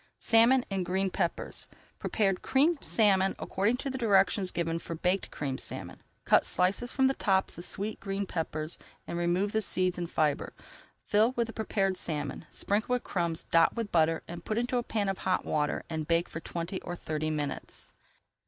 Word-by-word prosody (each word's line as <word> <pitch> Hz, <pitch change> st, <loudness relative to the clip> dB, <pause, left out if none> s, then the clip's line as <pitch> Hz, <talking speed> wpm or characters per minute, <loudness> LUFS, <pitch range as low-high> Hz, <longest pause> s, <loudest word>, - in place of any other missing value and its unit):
SALMON 235 Hz, +3 st, +5 dB
IN 190 Hz, -1 st, 0 dB
GREEN 190 Hz, +2 st, 0 dB
PEPPERS 170 Hz, -3 st, -2 dB, 0.3 s
Prepare 200 Hz, -3 st, +1 dB
Creamed 280 Hz, -, +2 dB
Salmon 195 Hz, -3 st, +3 dB
according 210 Hz, +6 st, 0 dB
to 275 Hz, +1 st, -3 dB
directions 200 Hz, -6 st, +3 dB
given 165 Hz, -1 st, -1 dB
for 165 Hz, -, -6 dB
Baked 180 Hz, +3 st, 0 dB
Creamed 135 Hz, -3 st, -3 dB
Salmon. -, -, -7 dB, 0.2 s
Cut -, -, +5 dB
slices 195 Hz, +7 st, +1 dB
from 265 Hz, -, +2 dB
the 265 Hz, -, +4 dB
tops 190 Hz, -6 st, +1 dB
of 175 Hz, -, -5 dB
sweet 210 Hz, +2 st, -3 dB
green 195 Hz, 0 st, -3 dB
peppers, 160 Hz, -2 st, -4 dB, 0.3 s
remove 175 Hz, +4 st, 0 dB
the 220 Hz, -, +1 dB
seeds 185 Hz, -3 st, 0 dB
and 170 Hz, -1 st, -3 dB
fibre, 150 Hz, -2 st, 0 dB, 0.5 s
fill 220 Hz, +4 st, +3 dB
with 235 Hz, -2 st, +1 dB
the 225 Hz, -, -9 dB
prepared 195 Hz, -4 st, 0 dB
salmon, 145 Hz, -5 st, -3 dB
sprinkle 215 Hz, +5 st, -1 dB
with 250 Hz, -, 0 dB
crumbs, 170 Hz, -3 st, -2 dB
dot 165 Hz, 0 st, +5 dB
with 230 Hz, -3 st, -3 dB
butter, 165 Hz, -1 st, +2 dB, 0.2 s
put 215 Hz, -, -2 dB
into 245 Hz, +1 st, 0 dB
a -, -, +2 dB
pan 215 Hz, -3 st, -1 dB
of 195 Hz, -1 st, -1 dB
hot 185 Hz, -1 st, 0 dB
water 150 Hz, -1 st, 0 dB
and 160 Hz, -2 st, -4 dB
bake 170 Hz, +1 st, +2 dB
for -, -, -5 dB
twenty 170 Hz, +3 st, -4 dB
or 175 Hz, -, -5 dB
thirty 155 Hz, -2 st, -3 dB
minutes. 150 Hz, -3 st, -4 dB
190 Hz, 175 wpm, -30 LUFS, 165-220 Hz, 0.5 s, SALMON